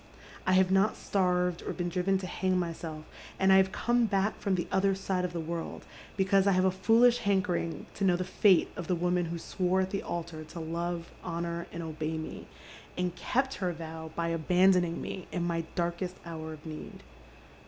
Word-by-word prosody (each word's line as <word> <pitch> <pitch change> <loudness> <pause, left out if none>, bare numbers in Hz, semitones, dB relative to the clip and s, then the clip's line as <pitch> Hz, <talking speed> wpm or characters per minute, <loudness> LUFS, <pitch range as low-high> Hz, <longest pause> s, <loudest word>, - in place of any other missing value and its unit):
I 185 - +4
have 185 0 +4
not 195 +3 +4
stai'ved 180 -2 +1
or - - -4
been 175 -1 -2
driven 185 +2 +1
to 190 - -5
hang 185 0 0
myself, 165 -3 -4 0.3
and 190 0 +5
I - - +8
have 190 0 +4
come 240 +2 +2
back 200 +1 0
from 200 -2 +1
the 175 - -2
other 195 0 +3
side 190 -1 -1
of 180 - -1
the 175 - -4
world 165 +1 -5 0.3
because 195 0 +3
I 200 - +5
have 185 +1 +3
a 190 - +4
foolish 225 +6 +4
hankering 190 -5 0
to 200 - -4
know 185 -2 +4
the 185 - -1
fate 185 0 +4
of 175 - -5
the 180 - +2
woman 175 +1 +1
who 170 +1 -4
swore 185 +2 0
at 190 0 -2
the 195 - -1
altar 170 -2 -5
to 160 +2 -9
love, 170 +1 -3
honour, 170 -1 -3
and 170 0 -5
obey 160 0 -3
me, 160 - -7 0.5
and 180 -1 -1
kept 265 +6 0
her 180 -1 +1
vow 160 0 -7
by 170 0 -1
abandoning 175 +1 +3
me 185 - -6
in 175 - -1
my 170 -1 -1
darkest 175 +1 -2
hour 160 -1 -6
of 155 0 -13
need. 155 -1 -8
180 Hz, 200 wpm, -30 LUFS, 170-190 Hz, 0.5 s, I